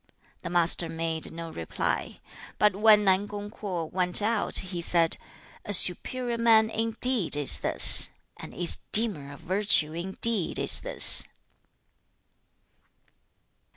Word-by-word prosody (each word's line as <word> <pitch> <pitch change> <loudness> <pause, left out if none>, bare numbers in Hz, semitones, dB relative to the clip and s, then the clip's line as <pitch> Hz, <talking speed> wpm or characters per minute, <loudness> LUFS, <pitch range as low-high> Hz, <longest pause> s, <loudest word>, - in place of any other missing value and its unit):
The 175 - -8
Master 170 -1 +1
made 165 -1 -4
no 165 0 -10
reply; 80 - -6 0.4
but 210 -3 0
when 210 0 +3
Nan 195 +1 0
kung 205 0 -10
Kwo 185 -7 -7
went 180 +2 +2
out, 215 +1 -3 0.2
he 175 - -5
said, 165 -1 -1 0.5
'A 205 - +3
superior 235 +7 +1
man 225 -1 +2
indeed 225 - +2
is 145 -2 +3
this! - - +2 0.3
An - - -12
esteemer 175 -3 -1
of 145 - -15
virtue 180 -3 0
indeed 190 +3 0
is - - +2
this!' - - +3
190 Hz, 120 wpm, -24 LUFS, 165-220 Hz, 0.5 s, when